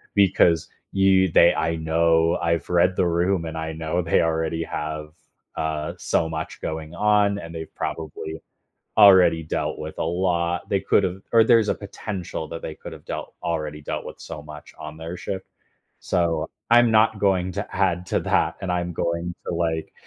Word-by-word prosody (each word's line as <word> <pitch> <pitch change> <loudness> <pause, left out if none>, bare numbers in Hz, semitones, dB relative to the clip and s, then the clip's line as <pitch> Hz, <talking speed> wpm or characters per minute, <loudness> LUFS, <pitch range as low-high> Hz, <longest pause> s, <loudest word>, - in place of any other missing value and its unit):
Because 90 -4 +4 0.3
you 95 -1 +4
they 85 - +6
I 80 +1 0
know 80 +1 +2
I've 85 -2 0
read 90 +1 +3
the 90 - +2
room, 85 +1 +1
and 80 0 -5
I 80 0 -4
know 80 +2 -2
they 85 - +2
already 80 0 0
have, 75 -1 -5 0.4
uh, 80 -1 -2
so 80 - 0
much 80 0 -5
going 80 +1 -5
on, 105 0 +3
and 85 -2 -9
they've 80 -1 -7
probably 80 0 -5 0.6
already 95 -5 +7
dealt 80 - -2
with 80 0 -6
a - - 0
lot. 85 0 0
They 100 - +2
could’ve 95 -1 +1
or 115 -1 +7
there's 115 -2 +4
a - - +1
potential 100 -5 -6
that 85 - -6
they 80 - -6
could've - - -11
dealt - - -6
already 75 -3 -3
dealt - - -4
with - - -9
so 75 - -8
much 75 0 -12
on 75 +1 -8
their 80 +2 -6
shift. 95 -1 -5 0.5
So, 85 -3 0 0.2
I'm 120 -1 +6
not 110 -1 +4
going 95 -2 +1
to 100 +1 -4
add 90 -2 +1
to - - +1
that, - - +1
and 95 -2 -2
I'm 90 0 -1
going 85 +1 -2
to, - - -3
like 80 -2 -2
85 Hz, 175 wpm, -23 LUFS, 80-95 Hz, 0.6 s, already